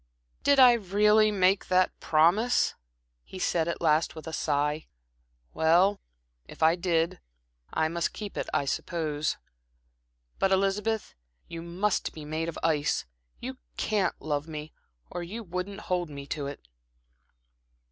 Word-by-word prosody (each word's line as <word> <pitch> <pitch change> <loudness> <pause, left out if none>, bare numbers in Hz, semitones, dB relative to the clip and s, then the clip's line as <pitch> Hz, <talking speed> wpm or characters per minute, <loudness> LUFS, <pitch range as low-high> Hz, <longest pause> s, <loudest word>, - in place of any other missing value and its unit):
"Did 280 0 +4
I 250 -2 +9
really 210 0 +4
make 190 -1 +2
that 185 0 +3
promise?" 175 +10 +3 0.5
he - - -10
said 170 -3 +1
at 170 - -3
last 160 0 +2
with 160 - -9
a 160 - -6
sigh. 150 0 0 0.7
"Well, 175 +5 +3 0.5
if - - -6
I 160 +1 +6
did, 170 -2 0 0.5
I 160 - +1
must 170 +1 -1
keep 210 -2 -7
it, - - -3
I 140 - +1
suppose. 155 0 -2 1.0
But, 195 - +2
Elizabeth, 200 +3 0 0.3
you 165 0 -7
must 185 +4 -1
be 155 -2 -9
made 160 +2 -2
of 165 - -7
ice 150 -3 +1 0.3
you - - -6 0.2
can't 205 -3 0
love 150 0 -2
me, 155 -1 -7 0.4
or 175 - -4
you 210 +7 -6
wouldn't 185 +2 -5
hold 180 -2 -1
me 140 -1 -8
to 145 -3 -3
it." 140 - -9
170 Hz, 140 wpm, -28 LUFS, 155-195 Hz, 1.0 s, I